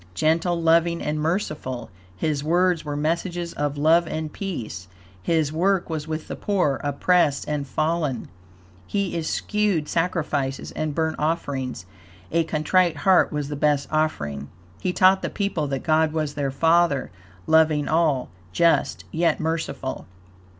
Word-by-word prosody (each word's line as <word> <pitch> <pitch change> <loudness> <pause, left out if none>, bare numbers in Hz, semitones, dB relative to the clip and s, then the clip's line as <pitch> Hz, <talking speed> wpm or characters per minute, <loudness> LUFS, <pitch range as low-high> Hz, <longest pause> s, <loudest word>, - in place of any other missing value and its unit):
Gentle, 165 - +1
loving 170 +1 +3
and 150 0 -2
merciful, 150 - -2 0.3
His 150 +1 -1
words 175 +1 +2
were 145 -1 -4
messages 170 +3 -2
of 145 0 -2
love 165 +3 +4
and 155 -1 -4
peace; 115 - -5 0.3
His 155 - +1
work 180 +1 +1
was 155 -1 -3
with 155 0 -4
the - - -5
poor, 180 -9 0
oppressed 145 +1 +2
and 145 -2 -2
fallen; 155 -2 -1 0.6
he 200 -3 -1
eschewed 175 +1 0
sacrifices 160 -6 -1
and 155 -2 -3
burnt 160 -1 0
offerings; 135 - -2 0.5
a 165 +1 +2
contrite 160 +2 +2
heart 190 -1 +5
was 150 -2 -2
the 145 - -3
best 145 -1 +1
offering; 75 - -1 0.3
He 180 - 0
taught 190 +1 +4
the - - -2
people 200 -7 -2
that 135 -2 -3
God 155 0 +2
was 155 -2 -1
their 145 -2 -1
Father, 160 - +2 0.3
loving 155 0 +3
all, 155 -5 +1 0.2
just, 170 - +2
yet 170 +1 +1
merciful. 160 -4 -3
155 Hz, 140 wpm, -24 LUFS, 145-170 Hz, 0.6 s, heart